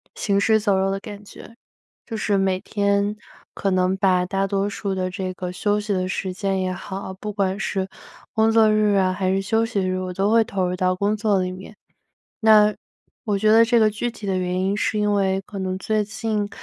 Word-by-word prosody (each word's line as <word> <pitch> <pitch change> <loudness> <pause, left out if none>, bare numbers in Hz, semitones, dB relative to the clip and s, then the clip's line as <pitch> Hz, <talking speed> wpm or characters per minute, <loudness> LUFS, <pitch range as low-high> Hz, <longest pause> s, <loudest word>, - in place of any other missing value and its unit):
行 200 -2 0
尸 220 +1 +3
走 205 -2 +1
肉 195 0 +1
的 195 - -2
感 205 -1 -10
觉。 230 - -13 0.5
就 225 - -6
是 205 -2 0
每 190 -1 +1
天 200 0 0 0.4
可 195 - -1
能 185 +1 +1
把 185 -2 +2
大 195 +1 -1
多 200 +1 0
数 200 -1 -3
的 185 0 -1
这 185 -2 -4
个 180 -1 -5
休 205 +3 0
息 210 0 -3
的 185 -1 0
时 190 0 -3
间 195 0 -1
也 185 0 -1
好 190 +1 -6
不 210 +2 -6
管 195 0 -1
是 190 -2 -2 0.4
工 220 0 +3
作 220 -1 +5
日 210 -1 +3
啊 185 -1 +3
还 185 0 -1
是 195 +1 +1
休 225 +4 +1
息 225 -4 -1
日， 185 0 -1
我 185 -1 -4
都 195 +3 +1
会 230 0 +5
投 195 -3 -1
入 180 - -2
到 185 0 +1
工 205 +3 0
作 205 -3 +1
里 185 - -2
面。 190 +3 -10 0.7
那， 210 -2 +6 0.5
我 205 -2 0
觉 215 +1 +3
得 225 +1 +7
这 235 +1 +3
个 215 -1 +4
具 230 +3 -3
体 215 -2 -10
的 190 -1 0
原 180 0 -1
因 195 +2 0
是 215 - 0
因 210 0 +1
为 195 -1 +1
可 200 - -7
能 185 0 -2
最 215 +2 0
近， 215 -1 -2
200 Hz, 240 characters per minute, -22 LUFS, 190-215 Hz, 0.7 s, 得